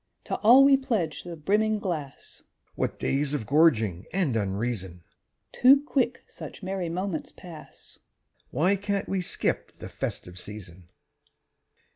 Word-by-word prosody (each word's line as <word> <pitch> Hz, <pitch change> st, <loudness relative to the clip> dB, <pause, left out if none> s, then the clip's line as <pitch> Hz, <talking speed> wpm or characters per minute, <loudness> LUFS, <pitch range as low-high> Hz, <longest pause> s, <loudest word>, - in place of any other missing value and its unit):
_) -, -, -46 dB
To -, -, -3 dB
all 245 Hz, +5 st, +7 dB
we 275 Hz, 0 st, +6 dB
pledge 215 Hz, -, -2 dB
the 175 Hz, -1 st, -7 dB
brimming 210 Hz, +7 st, +1 dB
glass! 165 Hz, -9 st, -5 dB, 0.3 s
(What -, -, -2 dB
days 140 Hz, +1 st, 0 dB
of 115 Hz, -, -3 dB
gorging 115 Hz, -, +3 dB
and 175 Hz, -10 st, 0 dB
unreason!) 100 Hz, -3 st, -3 dB, 0.5 s
Too 275 Hz, +3 st, +6 dB
quick 260 Hz, -4 st, 0 dB
such -, -, -10 dB
merry 185 Hz, -2 st, -3 dB
moments 180 Hz, -1 st, -3 dB
pass 165 Hz, -4 st, -11 dB, 0.5 s
(_Why 185 Hz, +8 st, +2 dB
can't 200 Hz, -1 st, -1 dB
we 195 Hz, -1 st, -1 dB
skip 180 Hz, -, -2 dB
the -, -, -8 dB
"festive 90 Hz, +1 st, -5 dB
season"? 95 Hz, -4 st, -10 dB
165 Hz, 135 wpm, -27 LUFS, -, 0.5 s, all